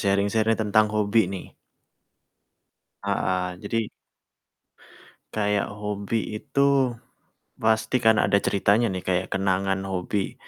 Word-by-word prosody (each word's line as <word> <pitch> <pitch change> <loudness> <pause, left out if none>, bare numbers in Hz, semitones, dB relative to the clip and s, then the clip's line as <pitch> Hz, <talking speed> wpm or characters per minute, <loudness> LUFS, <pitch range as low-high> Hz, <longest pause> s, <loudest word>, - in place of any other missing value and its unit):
sharing-sharing 100 +3 +2
tentang 110 0 +3
hobi 105 -1 +2
nih. 95 -1 -6 1.6
Heeh. 90 -1 -1
Jadi 110 +1 -1 1.5
kayak 105 -1 0
hobi 105 +1 -3
itu 140 -1 +2 0.7
pasti 110 +2 +2
kan 110 -1 +5
ada 100 - +3
ceritanya 100 +4 +2
nih 95 -2 -5
kayak 90 0 0
kenangan 95 0 0
hobi, 95 +1 -2
105 Hz, 95 wpm, -25 LUFS, 95-110 Hz, 1.6 s, kan